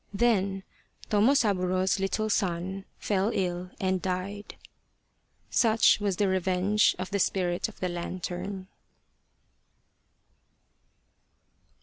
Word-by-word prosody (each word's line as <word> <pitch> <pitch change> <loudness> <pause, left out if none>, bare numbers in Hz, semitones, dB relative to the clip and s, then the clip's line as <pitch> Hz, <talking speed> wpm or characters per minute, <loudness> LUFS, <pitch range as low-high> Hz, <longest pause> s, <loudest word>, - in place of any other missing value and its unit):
Then 195 -4 +1 0.5
Tomosaburo's 200 -5 +2
little 195 +3 -1
son 190 -1 -1
fell 200 0 0
ill 180 -1 -2
and 190 -1 0
died. 190 +3 -4 1.0
Such 225 -2 +4
was 200 -3 0
the 200 +2 +1
revenge 190 +2 +2
of 185 0 -5
the 200 - 0
Spirit 180 +1 0
of 220 - -16
the 185 - -1
Lantern. 180 +2 -5
190 Hz, 90 wpm, -28 LUFS, 185-205 Hz, 1.0 s, Such